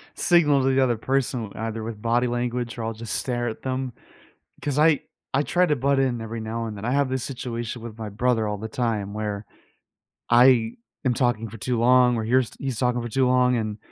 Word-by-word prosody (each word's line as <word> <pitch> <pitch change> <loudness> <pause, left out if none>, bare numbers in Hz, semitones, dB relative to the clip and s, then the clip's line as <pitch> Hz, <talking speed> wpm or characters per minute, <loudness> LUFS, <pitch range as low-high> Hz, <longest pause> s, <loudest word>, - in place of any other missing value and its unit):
signal 150 -6 +4
to 135 0 +2
the 135 - +4
other 120 -3 +1
person, 130 0 -1
with 100 - -9
either 110 0 -4
with 110 -1 -6
body 120 +2 +2
language 120 0 -2
or 115 - -4
I'll 115 0 -2
just 115 0 -6
stare 120 -2 -1
at 110 - -5
them, 130 -1 -3 0.7
'cause 145 0 -1
I 155 -1 +4 0.3
I 140 - +4
try 180 +4 +2
to 150 - +1
butt 140 +1 +1
in 125 -4 0
every 115 +1 -5
now 115 +1 -3
and 105 -2 -6
then. 100 - -6
I 120 - 0
have 140 0 +2
this 130 -1 -2
situation 120 -3 -5
with 115 -1 -8
my 110 -2 -5
brother 115 +1 +1
all 105 0 -2
the 110 - -5
time 110 -4 -2
where 105 -1 -3 0.8
I 120 -2 +5 0.3
am 125 - +3
talking 115 -3 0
for 115 - -10
too 125 -1 -1
long 125 +1 +5
or 110 - -1
here's 125 +1 +2
he's 130 -4 -3
talking 125 -1 +1
for 120 - -5
too 130 +3 +2
long, 125 0 +3
and 110 -2 -3
120 Hz, 225 wpm, -24 LUFS, 110-130 Hz, 0.8 s, I